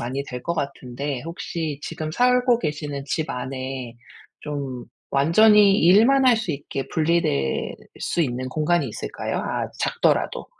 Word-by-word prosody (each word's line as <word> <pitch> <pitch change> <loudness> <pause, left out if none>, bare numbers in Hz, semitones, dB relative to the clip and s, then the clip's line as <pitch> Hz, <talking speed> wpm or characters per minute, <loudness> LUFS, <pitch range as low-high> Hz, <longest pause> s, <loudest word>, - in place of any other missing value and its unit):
많이 130 +4 -3
될 125 -2 -7
것 170 - -2
같은데 140 -1 -4
혹시 165 -3 -4
지금 155 -1 -5
살고 250 +3 +3
계시는 150 -5 -4
집 155 +2 -2
안에 130 -1 -5 0.4
좀 140 -4 -5 0.3
완전히 200 +8 +5
일만 230 +10 +5
할 245 -3 +6
수 205 -8 -2
있게 140 -1 -5
분리될 155 - 0 0.3
수 170 - 0
있는 130 -1 -2
공간이 155 0 +1
있을까요? 110 - -4
아 - - -3
작더라도. - - 0
150 Hz, 265 characters per minute, -23 LUFS, 130-175 Hz, 0.4 s, 할